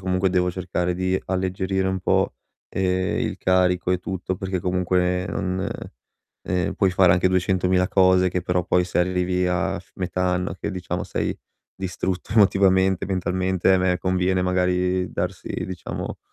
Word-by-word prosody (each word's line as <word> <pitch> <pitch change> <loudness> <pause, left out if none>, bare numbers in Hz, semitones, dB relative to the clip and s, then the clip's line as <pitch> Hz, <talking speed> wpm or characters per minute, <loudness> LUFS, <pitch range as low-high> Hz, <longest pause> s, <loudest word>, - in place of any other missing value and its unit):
comunque 95 0 +1
devo 90 -1 +1
cercare 90 -1 -2
di 95 +1 0
alleggerire 95 +1 -1
un 95 0 -1
po', - - +1 0.3
ehm, 95 -1 0
il - - -2
carico 90 -1 +2
e 90 - +1
tutto 95 0 -4
perché 95 0 -3
comunque 90 0 0
non 95 +1 -2 0.7
ehm, 90 0 -1
puoi 95 -2 +2
fare 90 -1 +5
anche 90 +1 +3
duecentomila 90 0 +2
cose 95 -1 +4
che 90 -1 -2
però 90 -1 0
poi 90 0 +2
se 90 - -2
arrivi 90 0 +1
a 90 +2 0
f 90 - -17
metà 90 0 -2
anno 90 0 0
che, 100 - -4
diciamo, 90 -4 -4
sei - - -2 0.4
distrutto 95 0 -4
emotivamente, 95 -3 +4
mentalmente, 95 0 +1
a - - +3
me 90 -1 +1
conviene 90 0 +1
magari 90 0 +1
darsi 90 +1 -4 0.2
diciamo 95 -1 -6
90 Hz, 155 wpm, -23 LUFS, 90-95 Hz, 0.7 s, fare